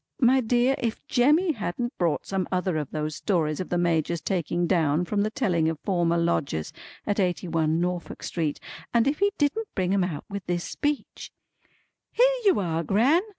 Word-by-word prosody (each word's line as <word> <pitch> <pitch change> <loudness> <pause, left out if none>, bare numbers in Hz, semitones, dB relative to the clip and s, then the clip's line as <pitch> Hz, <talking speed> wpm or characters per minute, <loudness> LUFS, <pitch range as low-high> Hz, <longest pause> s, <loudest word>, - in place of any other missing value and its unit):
My 260 0 +4
dear, 245 +3 +2
if 230 -2 -3
Jemmy 300 +8 +3
hadn't 240 - -3
brought 170 -4 0
some 190 -2 -2
other 185 -1 0
of 150 -3 -3
those 155 -1 -3
stories 160 -7 0
of 185 - -4
the 175 - 0
Major's 170 -1 +1
taking 175 +1 -1
down 165 -2 +2
from 200 +3 0
the 210 - +1
telling 180 - +1
of 160 - -3
former 170 -3 +1
lodgers 155 - -1 0.3
at 205 0 -1
Eighty 180 -1 0
one 160 -1 +1
Norfolk 180 0 -3
Street, 160 -4 -2 0.4
and 235 0 +4
if 280 +2 0
he 405 +1 +3
didn't 325 +10 0
bring 185 -1 0
'em 195 -2 +2
out 170 -5 -4
with 200 -1 -6
this 175 0 -1
speech: 295 -1 -3 0.8
"Here - - +4
you 385 - +5
are 165 -3 -1
Gran! 240 - +3
180 Hz, 185 wpm, -26 LUFS, 165-240 Hz, 0.8 s, you